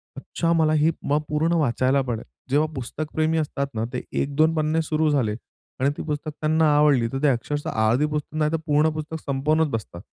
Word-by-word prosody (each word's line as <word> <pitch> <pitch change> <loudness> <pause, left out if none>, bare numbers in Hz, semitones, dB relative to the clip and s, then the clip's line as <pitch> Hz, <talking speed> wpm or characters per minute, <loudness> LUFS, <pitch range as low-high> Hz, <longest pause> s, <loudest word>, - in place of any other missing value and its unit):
अच्छा 165 -1 -2
मला 155 -2 +3
ही 155 +2 +3
म 145 +1 +1
पूर्ण 155 +3 +1
वाचायला 135 -3 +2
पडेल. 120 -4 -3 0.3
जेव्हा 150 +3 +2
पुस्तकप्रेमी 155 +5 -2
असतात 140 -2 -1
ना 110 - -2
ते 125 - -2 0.2
1-2 155 +3 +2
पन्ने 155 +1 +1
सुरू 155 0 +1
झाले 125 -8 +1 0.4
आणि 135 - +3
ती - - -4
पुस्तक 150 0 -3
त्यांना 155 -1 +3
आवडली 145 -5 +4
तर 135 - -2
ते - - +5
अक्षरशः 145 +3 -1 0.2
अर्धी 125 +7 +3
पुस्तक 150 0 -4
नाही 150 -1 +1
तर 165 - +1
पूर्ण 150 0 +3
पुस्तक 155 +1 -5
संपवूनच 150 +3 +1
बसतात. 110 -8 -5
150 Hz, 190 wpm, -24 LUFS, 135-155 Hz, 0.4 s, ते